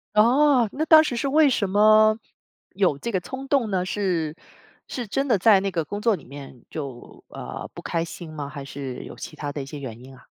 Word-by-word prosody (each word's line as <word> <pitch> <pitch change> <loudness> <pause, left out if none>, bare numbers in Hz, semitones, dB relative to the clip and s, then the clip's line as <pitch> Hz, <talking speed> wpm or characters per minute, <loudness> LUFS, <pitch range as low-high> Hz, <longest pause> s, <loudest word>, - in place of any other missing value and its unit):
哦， 250 +2 +5
那 305 - -1
当 315 -1 +8
时 250 - -2
是 275 - -1
为 300 0 +5
什 205 -6 0
么 215 +2 +5 0.6
有 180 -7 +1
这 235 - -4
个 185 - +2
冲 265 +6 -7
动 260 -7 +1
呢？ 185 -1 0
是， 175 -6 -1 0.5
是 245 -4 -5
真 270 +7 -1
的 235 -7 +3
在 195 0 +5
那 195 0 -2
个 165 -3 -2
工 205 +6 -5
作 225 -2 +3
里 145 - -15
面 135 -3 -11
就 135 -6 -8
呃 - - -7
不 - - -9
开 165 -1 -2
心 170 0 -8
吗？ 145 -2 -5
还 140 -2 -8
是 135 -2 -7
有 - - -10
其 155 - -9
他 145 -1 -4
的 145 - -4
一 - - -8
些 145 +1 -8
原 120 -5 -7
因 135 +1 -13
啊？ 130 - -17
195 Hz, 245 characters per minute, -24 LUFS, 145-235 Hz, 0.6 s, 当